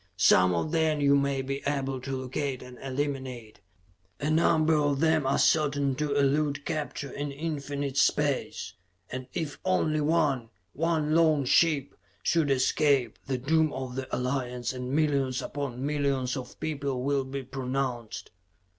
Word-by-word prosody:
Some 90 0 +5
of 150 - -1
them 160 -2 +2
you 140 -1 +4
may 140 -1 +1
be 135 +1 -3
able 135 -2 -1
to 135 +1 -3
locate 130 +1 -3
and 125 0 -12
eliminate; 130 -5 -4 0.6
a 150 - -1
number 160 0 +3
of 145 -2 +2
them 160 -3 +2
are 135 - +2
certain 145 -3 +2
to 150 -1 -1
elude 140 0 +1
capture 145 -3 -3
in 145 0 -4
infinite 140 -2 -4
space 145 0 +1 0.4
and 130 0 -5
if 160 -5 -3
only 155 -5 +1
one, 145 -6 +1 0.2
one 155 -1 0
lone 155 -4 +4
ship, 145 0 +3 0.3
should 165 -4 +2
escape, 135 -2 +2
the 135 -1 0
doom 155 +4 +2
of 130 -1 -5
the 130 0 -4
Alliance 125 -1 -2
and 125 0 -5
millions 140 -4 +1
upon 135 -2 -4
millions 140 -3 0
of 130 -2 -8
people 140 -5 -2
will 140 0 +1
be 135 +1 -5
pronounced. 125 -4 -4
140 Hz, 145 wpm, -28 LUFS, 130-150 Hz, 0.6 s, Some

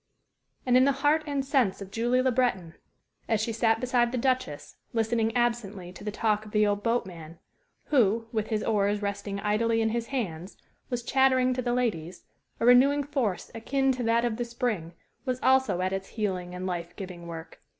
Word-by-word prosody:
And 250 -1 +3
in 255 +1 +6
the 280 - +3
heart 305 +2 +4
and 280 -2 -1
sense 260 -9 +1
of 195 -1 -9
Julie 240 +3 +1
Le 260 - +3
Breton, 210 -10 0 0.6
as 220 - +2
she 225 +1 -1
sat 225 0 +2
beside 245 -1 +1
the 255 - -2
Duchess, 255 - -2 0.2
listening 225 0 +1
absently 210 -7 -1
to - - -11
the 210 - -3
talk 210 0 0
of 215 - -11
the 210 0 +4
old 205 0 0
boatman, 180 -8 -3 0.5
who, 230 -5 +3
with 220 -2 -1
his 215 -2 -1
oars 205 -1 +1
resting 200 0 -3
idly 225 +2 +1
in 220 0 +2
his 230 +1 -2
hands, 190 -9 -4 0.3
was 245 -2 -3
chattering 260 0 +3
to 255 - -2
the 240 -1 -1
ladies, 185 -9 -2 0.4
a - - 0
renewing 270 +4 +6
force 270 -10 -2
akin 270 +4 0
to 255 -1 -3
that 230 0 +2
of 225 -2 -1
the 240 - -2
spring 230 -8 -3 0.3
was 255 -2 -2
also 260 -8 +3
at 185 +1 -1
its 195 0 -3
healing 185 -5 -3
and 180 +1 -5
life 175 -2 -4
giving 180 -4 -8
work. 165 -1 -9
225 Hz, 190 wpm, -27 LUFS, 195-250 Hz, 0.6 s, in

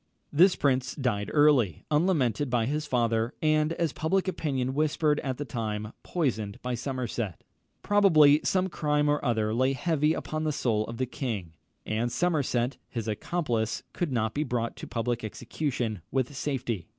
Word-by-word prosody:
This 180 +5 +6
prince 130 -2 +1
died 115 -7 -1
early, 140 - +4
unlamented 150 - +2
by 120 -2 +1
his 150 +4 -2
father, 115 -1 +1
and, 155 0 +2
as 165 -3 -1
public 190 +4 0
opinion 135 -8 -1
whispered 150 +1 +1
at 130 -3 -3
the 145 - -4
time, 105 -3 -4
poisoned 110 - -2
by 125 0 -2
Somerset. 120 - -3 0.4
Probably 155 -8 +6
some 185 0 +1
crime 150 -4 0
or 145 0 +1
other 110 -4 +1
lay 130 +3 +2
heavy 155 +2 +1
upon 155 0 -3
the 155 - +1
soul 110 -6 0
of 115 - -6
the 130 - 0
king; 115 - -4 0.3
and 115 +3 -1
Somerset, 140 -7 0
his 115 -3 -4
accomplice, 115 -1 -1
could 175 -5 -2
not 110 -3 0
be 150 - 0
brought 120 -4 -2
to - - -7
public 120 0 -2
execution 120 - -3
with 130 +2 -1
safety. 125 - -3
130 Hz, 160 wpm, -28 LUFS, 115-150 Hz, 0.4 s, This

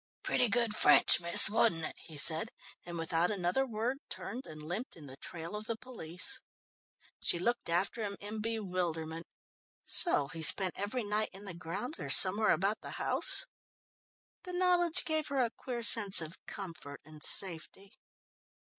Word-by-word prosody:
"Pretty 245 - -2
good 230 -1 -1
French, - - +4
miss, 170 0 +8
wasn't 210 -5 0
it?" - - -8
he 155 -3 -11
said, 160 +8 +3 0.3
and 175 -1 -10
without 165 +1 -2
another 200 +7 -3
word, 235 +4 -5
turned 255 +3 -9
and 155 -1 -13
limped 205 +10 -7
in 155 - -15
the 130 -1 -12
trail 170 +5 -9
of 210 +1 -9
the 230 - -5
police. 180 -9 -3 0.8
She - - 0
looked 240 +5 -4
after 190 +7 -3
him 200 -2 -7
in 210 +1 -9
bewilderment. 180 -7 -6 0.6
So 145 - +4
he 165 - -8
spent 185 +3 +6
every 215 +5 -6
night 210 +1 -4
in 195 +2 -14
the 190 - -9
grounds, 180 - -6
or - - -8
somewhere 205 +3 +6
about 200 +4 -2
the - - -10
house? - - +2 1.0
The 360 - -11
knowledge 355 -2 0
gave 315 -1 -3
her 280 - -6
a 230 - -7
queer 240 -2 -7
sense 210 -4 +6
of 160 0 -5
comfort 170 -7 -11
and 155 0 -16
safety. 190 +3 -2
200 Hz, 165 wpm, -29 LUFS, 170-230 Hz, 1.0 s, miss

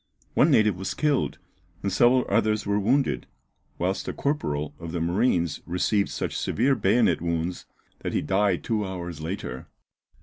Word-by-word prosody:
One - - +4
native 105 -4 +4
was 95 +1 -4
killed 150 -3 +1 0.5
and 100 -2 -1
several 120 +5 +4
others 110 0 +1
were 100 0 +1
wounded, 130 +7 +1 0.5
whilst 95 +3 -1
a - - -2
corporal 75 - -2
of 85 -1 -7
the 85 - -1
marines 85 - +1
received 100 +3 +1
such - - -3
severe 130 +5 +1
bayonet 105 -6 +2
wounds, 85 +1 -2 0.3
that - - -4
he - - 0
died 95 -1 +1
two 110 -2 0
hours 90 -4 -5
later. 80 -6 -5
95 Hz, 155 wpm, -26 LUFS, 85-110 Hz, 0.5 s, One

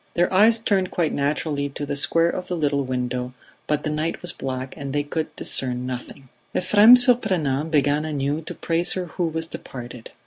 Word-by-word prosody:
Their 175 +2 +1
eyes 220 +4 +6
turned 195 -4 0
quite 165 -3 -1
naturally 145 0 -1
to 145 +1 -5
the 145 0 -3
square 165 +4 +2
of 180 - -5
the 180 - -3
little 145 -3 0
window, 125 -1 -3 0.3
but 150 -1 0
the 155 - -2
night 155 +2 -2
was 175 - -1
black 130 0 -5
and 140 -1 -6
they 145 0 0
could 155 +2 -4
discern 125 -1 -2
nothing. 130 +2 -7 0.3
Ephrem 210 +6 +7
Surprenant 185 - +2
began 145 -1 +2
anew 145 0 -2
to - - -6
praise 170 +1 +2
her 185 -1 -3
who 175 +1 -3
was 160 0 -3
departed. 120 -6 -9
150 Hz, 185 wpm, -23 LUFS, 135-175 Hz, 0.3 s, Ephrem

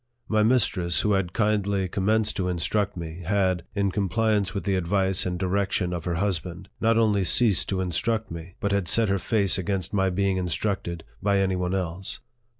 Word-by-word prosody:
My 110 -1 +2
mistress, 100 -7 +2
who 105 - +1
had 95 -3 0
kindly 100 -2 0
commenced 105 +3 0
to 95 -2 -1
instruct 95 +3 -1
me, 85 +1 -7
had, 95 -2 0
in 100 -1 +1
compliance 105 0 0
with 100 - -4
the 100 - 0
advice 95 +1 +1
and 90 -1 -2
direction 95 -1 -1
of 85 -2 -5
her 85 -2 -1
husband, 90 -1 -3
not 115 0 +2
only 105 -4 +2
ceased 105 +2 +3
to 95 -1 -1
instruct, 105 +4 -2 0.3
but 100 - -1
had 100 -3 0
set 115 +3 +4
her 100 0 +1
face 100 -2 +2
against 95 0 -2
my 95 -1 +2
being 95 +1 0
instructed 90 -1 -2 0.2
by 100 0 +2
any 95 -1 +1
one 90 +1 -1
else. 95 0 -3
95 Hz, 180 wpm, -25 LUFS, 90-105 Hz, 0.3 s, set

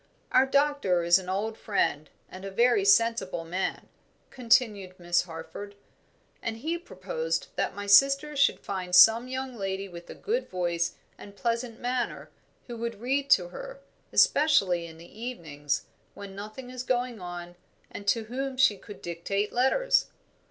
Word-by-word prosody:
"Our 265 - +5
doctor 280 -11 +2
is 170 +2 +5
an 185 -1 -8
old 215 +4 -2
friend 155 -7 -1 0.2
and 185 +1 -11
a 195 - -5
very 235 +1 +3
sensible 200 -4 +2
man," 180 +3 -3 0.4
continued 220 -6 +1
Miss 175 0 +2
Harford, 180 +4 -9 0.7
"and 225 -1 -3
he 325 +8 -3
proposed 480 +7 -4
that - - -1
my 205 - -5
sister 275 +8 +5
should 280 - +3
find 185 -2 -2
some 225 +6 +7
young 260 0 -5
lady 195 -2 -3
with 175 -2 -11
a - - -8
good 475 +4 -2
voice 170 -2 -1 0.2
and 200 0 -12
pleasant 235 +1 -2
manner 245 0 -3 0.3
who 240 -2 -7
would 230 -2 -4
read 270 +4 -1
to 180 -8 +4
her, - - -9 0.3
especially 200 - +3
in 160 -1 -12
the 170 +6 -14
evenings, 150 - -3 0.3
when 200 -1 -9
nothing 215 +5 -8
is 255 -1 -5
going 245 -3 -1
on, 175 0 -7 0.4
and 200 - -9
to 230 - +2
whom 260 +4 -4
she 255 -6 +4
could 205 - -12
dictate 195 +5 -2
letters." 265 - +2
215 Hz, 155 wpm, -28 LUFS, 185-255 Hz, 0.7 s, some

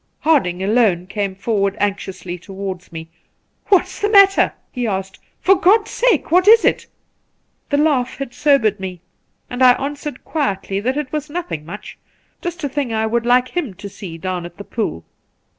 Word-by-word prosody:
Harding 190 - +2
alone 200 -4 +2
came 200 0 -3
forward 200 0 -1
anxiously 190 -3 -3
towards 190 -1 -7
me. 165 0 -8 0.6
'What's 385 -3 +2
the 415 - +1
matter 395 -2 +6
1' - - -8 0.2
he 245 -3 -2
asked. 190 -2 -4 0.2
'For 385 - +5
God's 410 +4 +3
sake, 460 - +1
what 365 +3 +4
is 450 +1 +7
it - - +1 0.4
?' - - -47
The 285 - +1
laugh 290 -5 +1
had 275 -3 -6
sobered 275 -9 +2
me, 185 -2 -6 0.5
and 245 +1 -6
I 250 -1 +8
answered 285 0 -5
quietly 200 -10 -2
that 255 +7 -1
it 295 -3 -3
was 300 0 -3
nothing 310 - -5
much 205 +5 -9 0.2
— - - -42
just 345 -1 -5
a - - +1
thing 270 -3 -2
I 220 0 0
would 235 +1 -1
like 250 +1 +3
him 295 - -3
to 195 +2 -8
see 190 -4 -9
down 180 +1 -3
at 175 0 -10
the 200 - -8
pool. 205 - -4
235 Hz, 185 wpm, -19 LUFS, 190-295 Hz, 0.6 s, I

